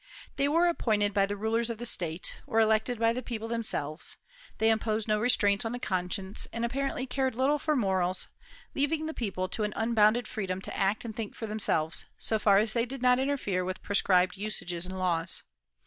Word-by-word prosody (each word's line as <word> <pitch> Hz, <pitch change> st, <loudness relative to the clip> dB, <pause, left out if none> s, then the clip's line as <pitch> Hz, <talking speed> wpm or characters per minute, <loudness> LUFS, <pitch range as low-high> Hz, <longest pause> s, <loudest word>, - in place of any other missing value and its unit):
They 280 Hz, -, +2 dB
were 330 Hz, +4 st, +3 dB
appointed 215 Hz, -, +1 dB
by 195 Hz, -1 st, +3 dB
the 205 Hz, +1 st, -3 dB
rulers 225 Hz, +3 st, 0 dB
of 230 Hz, -, -3 dB
the 240 Hz, -, -5 dB
state, 170 Hz, -5 st, -1 dB
or 225 Hz, -, +1 dB
elected 220 Hz, +2 st, +2 dB
by 230 Hz, +1 st, +3 dB
the 250 Hz, -, -3 dB
people 225 Hz, -2 st, -5 dB
themselves; 215 Hz, -10 st, -2 dB, 0.4 s
they 220 Hz, 0 st, +4 dB
imposed 220 Hz, 0 st, 0 dB
no 215 Hz, -1 st, +2 dB
restraints 210 Hz, -2 st, +3 dB
on 225 Hz, +1 st, -3 dB
the 245 Hz, -, -4 dB
conscience, 190 Hz, 0 st, -2 dB
and 230 Hz, 0 st, -2 dB
apparently 270 Hz, +1 st, -2 dB
cared 260 Hz, -1 st, -1 dB
little 275 Hz, +4 st, +2 dB
for 305 Hz, +1 st, 0 dB
morals, 190 Hz, -6 st, +1 dB, 0.5 s
leaving 305 Hz, +3 st, 0 dB
the 315 Hz, -, -3 dB
people 190 Hz, -7 st, -2 dB
to 215 Hz, -, -1 dB
an 210 Hz, 0 st, -1 dB
unbounded 225 Hz, 0 st, +3 dB
freedom 190 Hz, -5 st, -3 dB
to -, -, -5 dB
act 200 Hz, +4 st, 0 dB
and 220 Hz, -2 st, -6 dB
think 220 Hz, -2 st, -5 dB
for 225 Hz, -, -5 dB
themselves, 185 Hz, -7 st, 0 dB
so 220 Hz, -, +1 dB
far 200 Hz, -2 st, +5 dB
as 215 Hz, +2 st, +2 dB
they 235 Hz, 0 st, +1 dB
did 265 Hz, 0 st, -6 dB
not 250 Hz, 0 st, +5 dB
interfere 260 Hz, -9 st, 0 dB
with 185 Hz, +1 st, -5 dB
prescribed 185 Hz, -2 st, +2 dB
usages 180 Hz, -4 st, -3 dB
and 190 Hz, 0 st, -6 dB
laws. 170 Hz, -3 st, 0 dB
220 Hz, 200 wpm, -29 LUFS, 195-240 Hz, 0.5 s, far